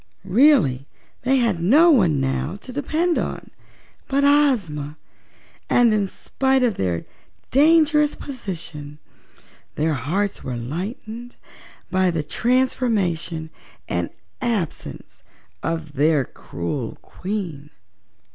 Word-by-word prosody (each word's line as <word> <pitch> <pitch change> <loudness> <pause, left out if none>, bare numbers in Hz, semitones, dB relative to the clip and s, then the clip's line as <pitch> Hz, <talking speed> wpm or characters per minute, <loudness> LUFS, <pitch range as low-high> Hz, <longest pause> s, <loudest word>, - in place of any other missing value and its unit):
Really, 195 - +4 0.3
they 265 +2 +2
had 225 -9 +1
no 300 - +6
one 180 - +4
now 135 +7 -1
to 255 - -9
depend 315 +5 0
upon - - -5 0.6
but 275 +1 +1
Ozma, 205 - +2 0.7
and 240 -3 +5
in 205 -2 +1
spite 265 +6 0
of 240 -3 +3
their 90 - -2 0.5
dangerous 300 +1 +4
position 165 - -7 0.8
their 155 +1 +1
hearts 175 +10 -2
were 125 - -4
lightened 215 - -6 0.6
by 185 0 +3
the 165 -3 -1
transformation 200 - 0 0.4
and - - -1 0.3
absence 220 - -3 0.4
of 165 -2 -3
their 145 -1 +3
cruel 115 - -5
Queen. 180 -7 -5
195 Hz, 100 wpm, -22 LUFS, -, 0.8 s, no